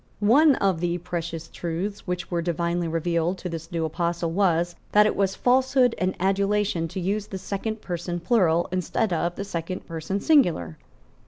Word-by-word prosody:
One 270 +8 +5
of 190 -4 +1
the 175 0 0
precious 165 -1 -5
truths 180 +5 -4
which 180 +1 -3
were 170 -1 0
divinely 170 0 -1
revealed 170 +2 0
to 180 - -5
this 165 +1 -7
new 165 -2 -1
apostle 170 +1 -1
was, 175 -2 +1 0.2
that 210 0 +7
it 215 - +1
was 195 -1 +1
falsehood 255 -1 +3
and 185 +1 0
adulation 195 -2 +1
to 185 +4 -5
use 200 +3 -1
the 190 - -5
second 210 +3 -4
person 175 0 -3
plural 175 -3 +2
instead 185 +2 0
of 170 +1 -1
the 200 - -4
second 175 -1 -5
person 165 +4 -3
singular. 175 - +2
180 Hz, 170 wpm, -25 LUFS, 170-200 Hz, 0.2 s, that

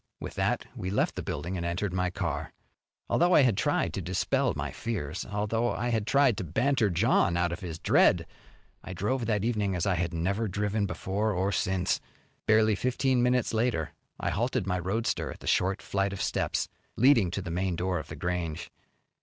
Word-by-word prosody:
With - - -6
that - - 0
we 95 - -4
left 100 - +1
the - - -3
building 85 +6 -4
and 85 - -3
entered 90 +3 -2
my 90 0 +1
car. - - -3 0.5
Although 175 +1 +3
I - - +8
had 120 -6 +3
tried - - 0
to - - -3
dispel 90 +2 0
my - - -3
fears, 90 -11 -4
although 105 +3 0
I 120 +2 -2
had 110 -2 0
tried 135 -6 +4
to - - -2
banter 115 - +1
John 90 -2 +2
out 85 -1 +1
of 85 - -4
his 85 -3 -6
dread, - - +4 0.6
I 95 - -7
drove 115 +6 -1
that 105 -3 +1
evening 105 -5 0
as 85 - -1
I 100 - +2
had 85 0 -1
never 100 +7 -1
driven 105 +1 -1
before 100 +5 -1
or 95 +2 0
since. 95 -2 0 0.5
Barely 110 0 +5
fifteen 125 +3 +1
minutes 125 -1 +2
later 110 -9 0 0.3
I - - -1
halted 120 - 0
my 90 -1 0
roadster 110 +6 -1
at - - -10
the - - -12
short 95 +2 +1
flight 100 0 -1
of 95 - -6
steps - - 0 0.3
leading 120 -6 +5
to 100 - -3
the 90 - -5
main 90 +1 -1
door 90 0 -1
of 75 - -8
The - - -7
Grange. 85 -3 -3
100 Hz, 195 wpm, -28 LUFS, 90-115 Hz, 0.6 s, I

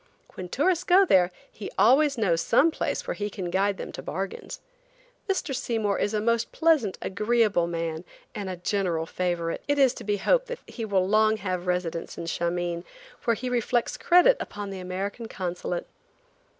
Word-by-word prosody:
When 180 -1 -7
tourists 340 - +1
go 370 +2 +5
there 180 - +4 0.2
he 205 - -7
always 275 +3 +5
knows 175 -7 +2
some 325 - +4
place - - -2
where - - -2
he 205 0 -3
can 185 -3 -5
guide 195 +2 +1
them - - -6
to - - -7
bargains. 190 +4 -5 0.7
Mr. 355 -7 -1
Seymour 225 -6 -1
is 205 - 0
a - - +2
most 230 +2 0
pleasant, 310 - +2
agreeable 210 -3 +1
man, 165 -1 -3 0.3
and 200 -2 -5
a 185 - -3
general 175 -2 -1
favorite. 175 -1 -2
It 285 0 +1
is 265 -3 +5
to - - -9
be 205 0 0
hoped - - +2
that - - -5
he 230 - -6
will 190 -3 +1
long 215 +1 +3
have 185 -3 -2
a - - -12
residence 180 -2 -2
in - - -5
Shameen, 170 +1 -2 0.4
where 230 -1 +3
he 255 +4 -5
reflects 240 -1 0
credit 360 +8 +5
upon 205 -1 -6
the 190 - -6
American 195 +5 -4
Consulate. 180 -3 -4
205 Hz, 180 wpm, -26 LUFS, 180-240 Hz, 0.7 s, go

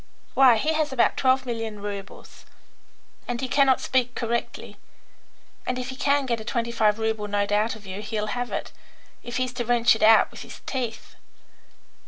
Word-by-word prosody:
Why, 260 -4 +6
he 305 +8 0
has 310 -2 0
about 260 -3 +2
twelve 260 0 +2
million 225 -3 -4
roubles, 200 -1 -8 0.8
and 245 -1 -3
he 260 - -2
cannot 270 0 +3
speak 250 -2 0
correctly; 235 0 -3 0.9
and 255 - -2
if 250 0 -4
he 260 - -6
can 280 0 +1
get 235 -3 -1
a - - -7
twenty 235 +1 -2
five 215 -2 +2
rouble 220 -1 -2
note 205 0 -1
out 210 +3 +1
of 215 -2 -14
you 190 +1 -6
he'll 215 0 -3
have 245 0 -3
it, - - -4 0.5
if 240 0 -5
he's 255 -1 -1
to 245 -1 -3
wrench 240 -1 +4
it - - -7
out 220 0 +6
with - - -10
his - - -11
teeth." 240 -5 -5
235 Hz, 185 wpm, -25 LUFS, 220-255 Hz, 0.9 s, Why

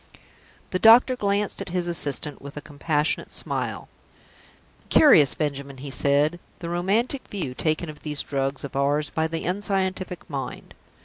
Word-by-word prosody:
The 185 - 0
doctor 235 +4 +7
glanced 205 -2 -1
at - - -6
his 175 0 -1
assistant 150 -3 0
with 140 +1 -10
a - - -2
compassionate 150 +1 -1
smile. - - -4 1.0
"Curious, 155 - +6
Benjamin," 140 -2 -3
he 135 +1 -7
said, 145 +5 +2 0.2
"the 170 - -6
romantic 205 +10 -1
view 175 -11 -4
taken 155 +5 -1
of 150 -1 -9
these 150 -2 -2
drugs 135 -1 -2
of 140 -2 -7
ours 145 +2 +1
by 160 0 0
the 165 0 -4
unscientific 190 -2 -2
mind! 140 -3 -6
155 Hz, 145 wpm, -24 LUFS, 140-185 Hz, 1.0 s, doctor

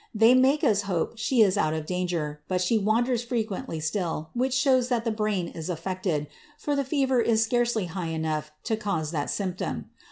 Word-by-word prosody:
They 225 +3 +6
make 265 +4 +4
us 205 -2 +3
hope 185 +5 -1
she 225 +1 +4
is 195 -3 +2
out 155 0 +1
of 155 -1 -4
danger, 170 -4 -2
but 185 -1 0
she 200 +5 +2
wanders 230 +4 +1
frequently 220 -8 -3
still, 160 -1 -2
which 255 +2 0
shows 260 -2 +3
that 240 -2 0
the 230 - +1
brain 210 -5 -1
is 160 +1 -7
affected, 175 -2 -2 0.3
for 290 -1 -1
the 280 - +1
fever 265 -2 +1
is 225 -1 +3
scarcely 235 -2 +1
high 175 0 -4
enough 155 -1 -2
to 225 - 0
cause 195 -8 -2
that 145 -3 -2
symptom. 185 -3 -3
205 Hz, 190 wpm, -26 LUFS, 165-240 Hz, 0.3 s, They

